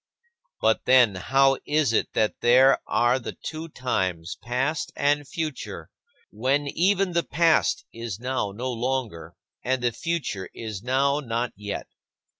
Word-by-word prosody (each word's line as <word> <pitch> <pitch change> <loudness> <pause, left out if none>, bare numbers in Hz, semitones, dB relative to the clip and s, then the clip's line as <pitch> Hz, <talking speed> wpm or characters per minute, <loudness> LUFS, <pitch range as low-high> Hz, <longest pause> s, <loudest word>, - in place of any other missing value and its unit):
But, - - +2
then, 125 -5 +6
how 135 +8 +2
is 145 -5 +1
it - - 0
that 110 -1 0
there 130 +3 +6
are 120 +4 +2
the 125 - -6
two 160 +1 -6
times, 90 - -2
past 135 +6 -1
and 145 0 +1
future, 155 0 -5 0.4
when 135 +7 0
even 190 +3 +1
the 170 - +3
past 165 +1 +2
is 115 -3 -6
now 125 -4 -2
no 125 +6 -4
longer 115 -9 -3 0.3
and 130 +1 -1
the 120 - +2
future 120 - -3
is 110 -4 -6
now 135 +4 +1
not 120 -3 -2
yet? 105 0 -5
130 Hz, 140 wpm, -25 LUFS, 115-145 Hz, 0.4 s, then